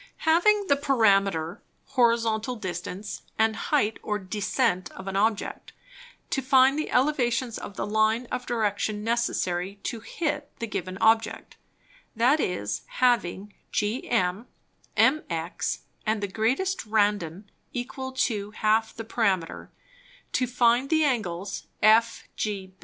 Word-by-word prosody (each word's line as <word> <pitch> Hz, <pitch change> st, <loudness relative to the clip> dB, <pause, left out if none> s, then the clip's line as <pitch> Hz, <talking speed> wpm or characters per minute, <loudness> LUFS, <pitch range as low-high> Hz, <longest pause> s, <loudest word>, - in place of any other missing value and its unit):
Having 400 Hz, +6 st, +4 dB
the 280 Hz, -, +3 dB
Parameter, 195 Hz, -, +2 dB, 0.3 s
Horizontal 235 Hz, -2 st, +2 dB
Distance, 185 Hz, 0 st, -5 dB, 0.2 s
and 220 Hz, 0 st, +3 dB
Height 225 Hz, -3 st, 0 dB
or 210 Hz, -, -1 dB
Descent 200 Hz, 0 st, -1 dB
of 190 Hz, -, -10 dB
an 195 Hz, -, -3 dB
Object, 215 Hz, +1 st, -1 dB, 0.6 s
to 270 Hz, -, +1 dB
find 265 Hz, +1 st, +5 dB
the 310 Hz, -, -2 dB
Elevations 250 Hz, -3 st, +1 dB
of 200 Hz, -, -8 dB
the -, -, -2 dB
Line 220 Hz, +3 st, +2 dB
of 250 Hz, 0 st, -3 dB
Direction 210 Hz, -2 st, -1 dB
necessary 200 Hz, -5 st, -1 dB
to 230 Hz, -, -3 dB
hit 295 Hz, +4 st, -3 dB
the 235 Hz, -, -3 dB
given 185 Hz, -3 st, -4 dB
Object; 225 Hz, +2 st, +2 dB, 0.6 s
that 250 Hz, +7 st, +4 dB
is, 105 Hz, -, -2 dB
having 210 Hz, -5 st, +1 dB, 0.2 s
GM, 210 Hz, -2 st, 0 dB, 0.5 s
MX, 175 Hz, -, +1 dB, 0.2 s
and 215 Hz, -1 st, -1 dB
the -, -, 0 dB
greatest 255 Hz, -, 0 dB
Randon 205 Hz, -3 st, 0 dB, 0.2 s
equal 260 Hz, 0 st, -5 dB
to 220 Hz, -6 st, -1 dB
half 220 Hz, +1 st, +1 dB
the 225 Hz, -, -6 dB
Parameter; 195 Hz, -7 st, -1 dB, 0.6 s
to 255 Hz, -, +1 dB
find 245 Hz, +2 st, +3 dB
the 315 Hz, -1 st, +3 dB
Angles 195 Hz, -, -2 dB, 0.2 s
FGB. 215 Hz, -3 st, +2 dB
220 Hz, 120 wpm, -26 LUFS, 200-255 Hz, 0.6 s, find